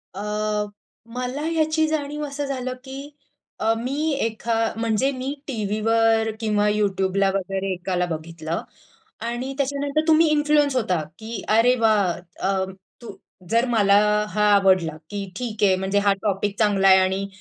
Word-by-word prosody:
अ, 200 Hz, -, -5 dB, 0.9 s
मला 250 Hz, +5 st, -3 dB
याची 315 Hz, -1 st, +1 dB
जाणीव 300 Hz, -1 st, -3 dB
असं 285 Hz, 0 st, -4 dB
झालं, 255 Hz, -2 st, -3 dB
की 270 Hz, +1 st, -8 dB, 0.5 s
अ, 225 Hz, +1 st, +2 dB
मी 280 Hz, +7 st, -1 dB
एका 225 Hz, +1 st, -2 dB, 0.2 s
म्हणजे 230 Hz, +4 st, +1 dB
मी 260 Hz, +1 st, -4 dB
टीव्हीवर 225 Hz, 0 st, +1 dB
किंवा 210 Hz, -2 st, +1 dB
YouTubeला 195 Hz, -2 st, +1 dB
वगैरे 195 Hz, 0 st, -2 dB
एकाला 180 Hz, 0 st, -1 dB
बघितलं 160 Hz, 0 st, -4 dB, 0.6 s
आणि 245 Hz, +3 st, -3 dB
त्याच्यानंतर 280 Hz, +2 st, 0 dB
तुम्ही 320 Hz, +1 st, +5 dB
इन्फ्लुअन्स 295 Hz, -2 st, +2 dB
होता, 185 Hz, -9 st, +1 dB, 0.2 s
की 225 Hz, +1 st, -6 dB
"अरे 245 Hz, +3 st, +5 dB
वाह!" 215 Hz, -5 st, +3 dB, 0.4 s
अ, 195 Hz, -1 st, +1 dB, 0.4 s
तू 235 Hz, -, -8 dB, 0.4 s
जर 230 Hz, +2 st, +3 dB
मला 200 Hz, -2 st, +5 dB, 0.3 s
हा 210 Hz, 0 st, +1 dB
आवडला, 185 Hz, -5 st, +3 dB
की 205 Hz, -1 st, -4 dB
ठीक 225 Hz, -4 st, -4 dB
आहे 190 Hz, -2 st, +5 dB
म्हणजे 190 Hz, +2 st, 0 dB
हा 200 Hz, -, +6 dB
टॉपिक 200 Hz, 0 st, -1 dB
चांगला 205 Hz, -3 st, +3 dB
आहे 190 Hz, 0 st, +8 dB
आणि 190 Hz, +1 st, 0 dB
220 Hz, 140 wpm, -23 LUFS, 195-270 Hz, 0.9 s, आहे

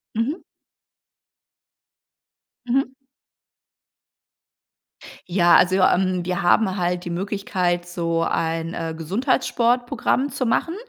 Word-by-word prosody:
Mhm. 230 Hz, +7 st, 0 dB, 2.3 s
Mhm. 260 Hz, +1 st, 0 dB, 2.3 s
Ja 175 Hz, -1 st, +4 dB
also, 185 Hz, +1 st, +4 dB
ähm, 185 Hz, -1 st, +2 dB
wir 180 Hz, +2 st, -2 dB
haben 190 Hz, +2 st, +3 dB
halt 180 Hz, 0 st, -1 dB
die 175 Hz, -, -6 dB
Möglichkeit 180 Hz, -1 st, -2 dB
so 170 Hz, -1 st, -2 dB
ein, 165 Hz, +1 st, -2 dB
äh, 165 Hz, -1 st, -4 dB
Gesundheitssportprogramm 245 Hz, -, 0 dB
zu 260 Hz, -1 st, -3 dB
machen. 325 Hz, +8 st, 0 dB
185 Hz, 90 wpm, -22 LUFS, 175-230 Hz, 2.3 s, Ja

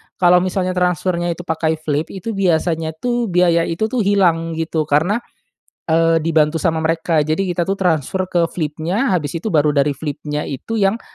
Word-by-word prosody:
kalau 180 Hz, 0 st, +5 dB
misalnya 185 Hz, 0 st, -1 dB
transfernya 180 Hz, -1 st, 0 dB
itu 175 Hz, -, -9 dB
pakai 160 Hz, -1 st, -1 dB
Flip, 155 Hz, 0 st, -2 dB
itu 195 Hz, +4 st, -6 dB
biasanya 165 Hz, -4 st, 0 dB
tuh 240 Hz, +6 st, -1 dB
biaya 175 Hz, -2 st, +2 dB
itu 215 Hz, +7 st, -2 dB
tuh 255 Hz, -, 0 dB
hilang 175 Hz, -6 st, +2 dB
gitu 160 Hz, -1 st, -2 dB
karena, 160 Hz, +10 st, +2 dB, 0.7 s
eee, 165 Hz, 0 st, +3 dB
dibantu 160 Hz, 0 st, +1 dB
sama 160 Hz, +1 st, +1 dB
mereka 165 Hz, -1 st, +1 dB
jadi 155 Hz, +4 st, 0 dB
kita 175 Hz, -1 st, -1 dB
tuh 195 Hz, -, 0 dB
transfer 185 Hz, 0 st, -1 dB
ke 175 Hz, -2 st, +2 dB
Flip-nya 165 Hz, -, -2 dB
habis 155 Hz, -6 st, -1 dB
itu 170 Hz, +6 st, -3 dB
baru 150 Hz, -4 st, +2 dB
dari 140 Hz, 0 st, +2 dB
Flip-nya 150 Hz, 0 st, -4 dB
itu 225 Hz, +11 st, -4 dB
yang 205 Hz, +2 st, +1 dB
165 Hz, 170 wpm, -18 LUFS, 160-185 Hz, 0.7 s, kalau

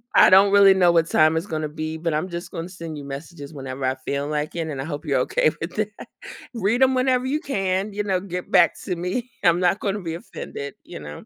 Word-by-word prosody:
I -, -, +8 dB
don't 195 Hz, +1 st, +7 dB
really 200 Hz, -1 st, +8 dB
know 180 Hz, -2 st, +4 dB
what 165 Hz, -1 st, +3 dB
time 155 Hz, +1 st, +4 dB
it's 165 Hz, -, -2 dB
gonna 155 Hz, -3 st, -3 dB
be, 155 Hz, +1 st, -5 dB
but 165 Hz, -1 st, -2 dB
I'm 155 Hz, +5 st, -1 dB
just 170 Hz, +1 st, -6 dB
gonna 165 Hz, +2 st, -5 dB
send 165 Hz, -4 st, -8 dB
you 145 Hz, -, -7 dB
messages 145 Hz, +2 st, -8 dB
whenever 135 Hz, -1 st, -5 dB
I 130 Hz, +1 st, +1 dB
feel 140 Hz, +1 st, -2 dB
like 150 Hz, +1 st, -3 dB
it, 165 Hz, -2 st, -2 dB
and 140 Hz, -3 st, -4 dB
I -, -, -5 dB
hope 150 Hz, 0 st, -6 dB
you're 140 Hz, -3 st, +1 dB
okay 155 Hz, -, +2 dB
with 165 Hz, +2 st, -5 dB
that. 215 Hz, 0 st, -1 dB, 0.7 s
Read 230 Hz, +3 st, 0 dB
'em 260 Hz, 0 st, +3 dB
whenever 255 Hz, 0 st, +2 dB
you 295 Hz, +3 st, 0 dB
can, 195 Hz, -, -1 dB
you 210 Hz, 0 st, -2 dB
know, 190 Hz, -3 st, 0 dB
get 180 Hz, -1 st, -6 dB
back -, -, +4 dB
to 180 Hz, -, -2 dB
me. 190 Hz, +9 st, -3 dB
I'm 170 Hz, 0 st, +4 dB
not 180 Hz, +2 st, +2 dB
gonna 205 Hz, 0 st, -2 dB
be 165 Hz, -2 st, -4 dB
offended," 140 Hz, -4 st, -7 dB
you -, -, -9 dB
know. 75 Hz, 0 st, -9 dB
170 Hz, 245 wpm, -23 LUFS, 150-195 Hz, 0.7 s, I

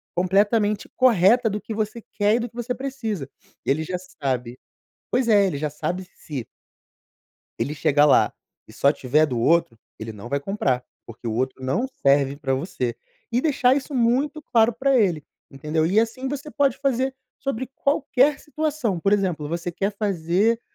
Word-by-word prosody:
completamente 205 Hz, +3 st, +2 dB
correta 235 Hz, -1 st, +5 dB
do 210 Hz, +1 st, -3 dB
que 215 Hz, -, -9 dB
você 215 Hz, +2 st, -3 dB, 0.2 s
quer 210 Hz, +1 st, +3 dB
e -, -, +1 dB
do 240 Hz, 0 st, -3 dB
que -, -, -27 dB
você 240 Hz, +1 st, -2 dB
precisa. 225 Hz, -, -4 dB, 0.4 s
Ele 150 Hz, +4 st, +1 dB
já 180 Hz, +3 st, -3 dB
sabe 130 Hz, -9 st, -4 dB, 0.5 s
pois 250 Hz, 0 st, +1 dB
é, 205 Hz, -3 st, +5 dB
ele 175 Hz, -, -2 dB
já 150 Hz, +1 st, -2 dB
sabe 180 Hz, +5 st, -3 dB
se 135 Hz, -7 st, -6 dB, 1.1 s
ele 150 Hz, -, -1 dB
chegar 145 Hz, -1 st, +3 dB
lá -, -, +4 dB, 0.3 s
e -, -, -15 dB
só 140 Hz, -, +3 dB
tiver 150 Hz, +3 st, +2 dB
do 125 Hz, -5 st, -3 dB
outro, 120 Hz, -2 st, +2 dB, 0.2 s
ele 110 Hz, 0 st, -6 dB
não 105 Hz, +3 st, -9 dB
vai 140 Hz, -, 0 dB
comprar, 140 Hz, -8 st, -1 dB, 0.2 s
porque 115 Hz, +1 st, -10 dB
o 110 Hz, -, -1 dB
outro 130 Hz, +2 st, -2 dB
não 180 Hz, -, 0 dB, 0.2 s
serve 140 Hz, 0 st, +3 dB
para 135 Hz, -2 st, -1 dB
você. 130 Hz, -4 st, -3 dB, 0.4 s
E 240 Hz, -, +2 dB
deixar 260 Hz, -3 st, +3 dB
isso 285 Hz, +1 st, -4 dB
muito 260 Hz, +6 st, +1 dB
claro 230 Hz, -3 st, +3 dB
para 265 Hz, +4 st, +2 dB
ele, 180 Hz, -, +2 dB, 0.3 s
entendeu? 150 Hz, +3 st, -1 dB
E 190 Hz, +6 st, +2 dB
assim 245 Hz, +4 st, -2 dB
você 285 Hz, +2 st, -5 dB
pode 280 Hz, -3 st, +1 dB
fazer 265 Hz, -1 st, 0 dB, 0.2 s
sobre 260 Hz, -2 st, -3 dB
qualquer 280 Hz, -1 st, +2 dB
situação, 300 Hz, -, -2 dB
por 200 Hz, +4 st, +2 dB
exemplo, 180 Hz, -7 st, 0 dB
você 170 Hz, +2 st, -3 dB
quer 195 Hz, +4 st, -1 dB
fazer 200 Hz, +3 st, +1 dB
200 Hz, 175 wpm, -23 LUFS, 145-245 Hz, 1.1 s, correta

